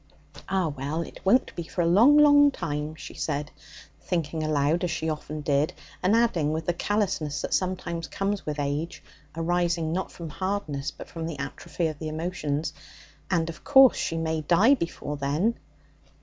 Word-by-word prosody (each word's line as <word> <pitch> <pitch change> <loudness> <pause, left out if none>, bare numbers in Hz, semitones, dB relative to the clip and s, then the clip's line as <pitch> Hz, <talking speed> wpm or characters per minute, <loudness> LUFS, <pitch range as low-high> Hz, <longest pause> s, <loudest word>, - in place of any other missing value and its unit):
'Ah, 190 -3 +1
well, 145 +4 -3
it - - -11
won't 240 +7 +3
be - - -3
for 170 +2 -3
a - - +1
long, 225 - +6
long 290 -1 +7
time,' 150 - -4
she 150 - -9
said, 150 -1 -3 0.5
thinking 165 -3 -2
aloud 155 +2 +1
as 180 - 0
she 160 0 -2
often 155 -1 -4
did, 145 +1 +1 0.3
and 190 +4 +3
adding 190 -11 +2
with 160 +1 -2
the 175 - +1
callousness 175 -6 -1
that - - -2
sometimes 175 -3 -1
comes 195 +5 -2
with 150 -1 -4
age 145 +4 -3 0.3
arising 170 -1 0
not 185 +2 -2
from 170 -2 -8
hardness, 155 -6 -2
but - - -10
from 165 -1 -5
the 165 -4 -5
atrophy 145 +4 -4
of 155 -2 -3
the 155 - -4
emotions 155 -2 -2 0.6
'and, 165 -3 +1
of 165 -1 -8
course, 270 -2 +7
she 165 - -2
may 160 -1 -1
die 180 - +5
before 165 - -3
then.' 150 +11 +1
165 Hz, 175 wpm, -26 LUFS, 150-185 Hz, 0.6 s, long